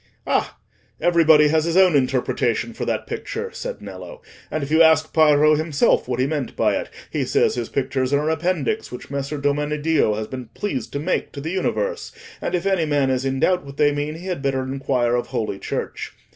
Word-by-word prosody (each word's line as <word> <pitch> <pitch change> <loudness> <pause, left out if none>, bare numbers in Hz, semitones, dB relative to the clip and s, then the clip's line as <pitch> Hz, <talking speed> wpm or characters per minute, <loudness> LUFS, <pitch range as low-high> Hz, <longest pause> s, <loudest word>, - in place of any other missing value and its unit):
"Ah! - - 0 0.4
everybody 160 -3 +5
has 155 0 +2
his 170 +1 0
own 185 -4 +6
interpretation 130 - 0
for - - -4
that - - -2
picture," 460 +1 -5
said - - -6
Nello; - - -9 0.3
"and 155 - -2
if 140 - -5
you 160 +1 +5
ask 160 -1 +4
Piero 155 -1 +5
himself 155 -4 +2
what 125 -1 -2
he 130 - +3
meant 145 -2 -3
by - - +2
it, - - -3 0.2
he - - -1
says - - +2
his 120 -2 -4
pictures 130 -1 -1
are 145 +1 +2
an 155 - +1
appendix 175 +4 -1
which 125 - -9
Messer 140 +1 -3
Domeneddio 145 -3 +1
has 110 0 -3
been 125 +1 -7
pleased 135 - -3
to 140 - -2
make 165 +6 -1
to 140 - -6
the 160 +4 -4
universe, 465 - -2 0.3
and - - -1
if 175 +1 -2
any 190 -4 +2
man 145 -3 +1
is 130 0 -1
in 135 0 -1
doubt 180 +3 +2
what 140 0 -11
they 145 -1 +4
mean, 145 +1 -3
he 170 +3 -10
had 180 -6 -3
better 135 -1 0
inquire 130 -2 0
of 120 - -1
Holy 105 -3 -3
Church. - - -4
150 Hz, 210 wpm, -22 LUFS, 135-165 Hz, 0.4 s, own